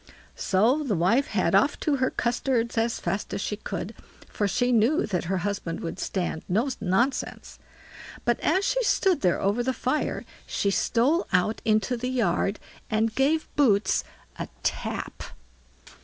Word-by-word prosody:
So 225 +10 +2
the 235 -8 0
wife 225 - +2
had - - 0
off - - +3
to 295 -3 +1
her 260 0 +1
custards 240 -1 0
as 230 +1 0
fast 195 +4 -3
as - - -3
she 210 - -2
could, 200 -1 -5 0.3
for 205 - -1
she 245 +6 +1
knew 245 +9 +3
that 180 -4 -2
her 190 +3 0
husband 200 -5 -3
would 170 +2 -5
stand 175 -4 -2
no 220 +9 +1
nonsense; 220 +8 -1 0.7
but 240 -1 +2
as 375 +6 +2
she - - +1
stood 385 -5 +2
there 180 -2 +2
over 200 +5 +1
the 260 +2 0
fire 255 +4 -1 0.2
she 200 - 0
stole 255 - +2
out 180 +5 +1
into 215 +2 +2
the 250 +2 -3
yard, 205 -4 0 0.3
and 220 +1 +1
gave 295 +6 +1
Boots 215 -8 +3 0.4
a - - -3 0.2
tap. - - -3
225 Hz, 155 wpm, -26 LUFS, 195-260 Hz, 0.7 s, off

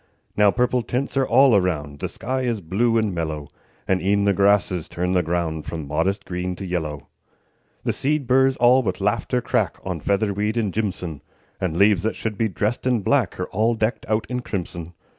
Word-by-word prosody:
Now 105 -1 +5
purple 125 +3 +1
tints 125 +4 -3
are 135 -1 +2
all 130 -1 +6
around; 75 -7 0
The - - -3
sky 130 +2 -3
is 120 -4 -1
blue 110 +7 +1
and 110 -3 +1
mellow; 80 -4 -4 0.4
And 95 -1 +1
e'en 100 +2 +2
the 100 - +4
grasses 100 -3 +2
turn 90 +1 -1
the 90 - +3
ground 80 -2 -2
From 80 -3 -5
modest 95 +7 -1
green 90 0 -3
to 95 - -7
yellow. 80 -5 -3 0.8
The - - 0
seed 145 0 0
burrs 130 +2 +3
all 125 +2 +5
with 95 -7 -2
laughter 105 +5 0
crack 120 -4 0
On 90 -3 -3
featherweed 105 +4 0
and 105 -5 0
jimson; 90 -8 -3 0.4
And 85 -3 -2
leaves 100 -1 +4
that 110 +3 -1
should 110 -2 -3
be 110 +1 0
dressed 105 +7 -2
in 125 -4 +2
black 125 -10 +1
Are 90 - -1
all 110 +4 +1
decked 110 +1 -1
out 110 0 +1
in 125 0 -2
crimson. 85 -6 -5
100 Hz, 195 wpm, -23 LUFS, 90-120 Hz, 0.8 s, all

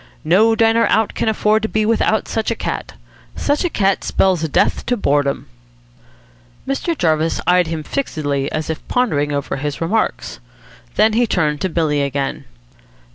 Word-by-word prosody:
No 210 +8 +4
diner 225 +1 +3
out 220 -1 +1
can - - 0
afford 215 0 +2
to 220 - -2
be 215 0 0
without 220 -1 +1
such 220 -1 -2
a 230 - -1
cat. - - -4 0.4
Such 290 +4 0
a 355 - +1
cat 195 - +1
spells 185 -4 +1
death - - +1
to 245 - +1
boredom." 145 -6 0 1.2
Mr. 295 +4 -1
Jarvis 160 -1 +1
eyed 180 -1 +3
him 160 -1 -4
fixedly, 145 - -2
as 155 +1 -2
if 160 - -7
pondering 150 -13 0
over 140 -1 -2
his 145 +1 -4
remarks. 195 - -1 0.6
Then 220 0 +4
he 235 +2 +2
turned 150 -7 0
to 190 - 0
Billy 155 -4 0
again. 140 0 -2
180 Hz, 160 wpm, -18 LUFS, 150-225 Hz, 1.2 s, No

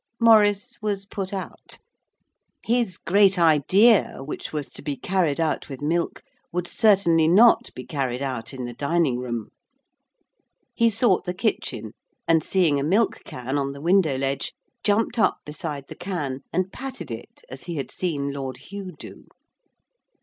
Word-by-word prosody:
Maurice 220 0 +4
was 200 -2 -2
put 195 -2 -5
out. 195 -2 -7 0.9
His 230 -6 0
great 195 +1 +3
idea, 180 - +4
which 145 - -6
was 150 -3 -4
to - - -10
be 145 -2 -3
carried 170 -1 0
out 160 -2 -1
with 135 -2 -7
milk, 170 +3 -1 0.3
would 175 0 -2
certainly 185 -8 +4
not 230 +6 +5
be - - -7
carried 135 -4 -2
out 125 -5 -4
in 130 -2 -6
the 120 - -6
dining 140 -1 0
room. 120 -3 -4 1.2
He 230 0 +3
sought 225 -3 +2
the 180 - -3
kitchen, 130 - -2 0.4
and, 165 -2 +4
seeing 165 -7 +2
a - - -1
milk 200 +9 +2
can 130 +3 -3
on 140 0 -2
the 140 - -10
window 165 -3 +3
ledge, 135 +1 -2 0.3
jumped 220 +3 +1
up 215 - +3
beside 150 -2 -5
the - - -8
can 155 -8 -4
and 185 +1 -1
patted 270 0 -7
it - - -9
as - - -9
he 175 -1 -5
had 140 -3 -4
seen 145 -6 -2
Lord 135 -2 -5
Hugh 185 +6 -8
do. - - -11
170 Hz, 155 wpm, -24 LUFS, 140-200 Hz, 1.2 s, not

